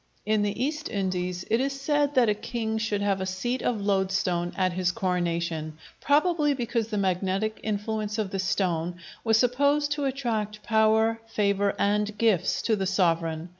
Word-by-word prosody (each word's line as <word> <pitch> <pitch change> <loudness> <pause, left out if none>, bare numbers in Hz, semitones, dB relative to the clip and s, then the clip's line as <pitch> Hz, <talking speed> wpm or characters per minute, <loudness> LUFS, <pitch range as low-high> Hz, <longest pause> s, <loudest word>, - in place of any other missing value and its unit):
In 215 0 +2
the 205 +1 -1
East 305 +2 -3
Indies 180 -2 -2
it 230 +3 +3
is 275 0 -2
said 290 0 +1
that 250 -3 +5
a 210 - +3
king 220 0 -3
should 210 -2 -1
have 195 -2 +1
a - - -1
seat 240 +7 -2
of 235 -3 0
loadstone 190 -3 0
at 185 -2 +1
his 180 0 +1
coronation; 170 -4 -2 0.2
probably 300 0 +2
because 235 -3 -1
the 215 - -3
magnetic 195 +3 0
influence 215 0 -2
of 210 -3 -2
the 195 - -2
stone 180 -3 0 0.3
was 225 -1 +4
supposed 285 +5 +2
to 290 -1 -1
attract 220 -6 -2
power, 220 +1 +3
favor, 200 -2 +1
and 210 +1 0
gifts 210 -6 +2
to 225 - +2
the 195 -2 -1
sovereign. 165 -3 0
210 Hz, 170 wpm, -26 LUFS, 185-230 Hz, 0.3 s, that